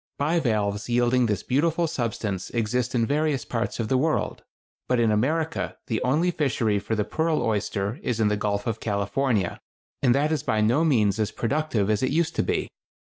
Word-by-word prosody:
Bivalves 115 -10 0
yielding 120 +1 +3
this 105 -3 -1
beautiful 165 +6 +1
substance 110 - -3
exist 120 +2 -1
in 115 -1 +2
various 150 +1 0
parts 115 -2 -3
of 115 - -1
the 130 +3 +2
world; 155 +2 0 0.5
but 125 -1 +2
in 115 -2 +3
America 155 +9 0
the 110 - -2
only 155 +8 +2
fishery 120 -10 0
for 110 - -2
the 105 - +1
pearl 160 +7 0
oyster 105 +2 -1
is 115 -2 -2
in 110 - +3
the 105 - +1
Gulf 105 0 -1
of 115 -2 -2
California, 105 0 0 0.4
and 125 -2 +4
that 150 +3 +1
is 155 -4 0
by 110 - 0
no 120 +9 +3
means 110 -9 +2
as 110 - +1
productive 120 -5 -1
as 105 -1 +1
it 130 - +1
used 160 +3 0
to - - +4
be. - - -1
120 Hz, 190 wpm, -25 LUFS, 105-145 Hz, 0.5 s, and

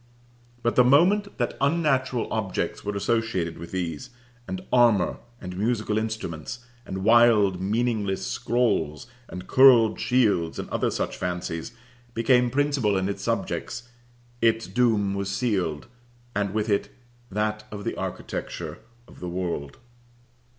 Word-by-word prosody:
But 115 - +1
the 125 - +7
moment 185 +11 +3
that - - -1
unnatural 135 -5 +1
objects 105 -4 -2
were 105 0 -3
associated 100 -6 -1
with 85 0 -8
these, 95 +7 -4 0.4
and 185 0 -5
armor, 120 -7 +4 0.2
and 90 -1 -7
musical 110 +1 0
instruments, 110 0 -5 0.2
and 95 0 -4
wild 110 -4 +5
meaningless 105 - 0
scrolls 110 - 0 0.2
and 90 0 -7
curled 125 -4 +6
shields, 105 -10 +2
and - - -4
other - - +1
such - - -3
fancies, 90 -1 -4 0.4
became 125 +1 +3
principal 135 -6 +1
in 95 0 0
its 100 - -4
subjects, 120 +1 -3 0.5
its 115 0 +3
doom 105 -1 +1
was 100 0 -2
sealed, 95 - -1 0.5
and 100 -2 0
with 105 +1 -1
it 100 -2 0 0.4
that 105 +1 -2
of 100 -1 -7
the - - -3
architecture - - -5 0.3
of - - -16
the 90 - -5
world. 85 -5 -4
110 Hz, 130 wpm, -25 LUFS, 95-120 Hz, 0.5 s, the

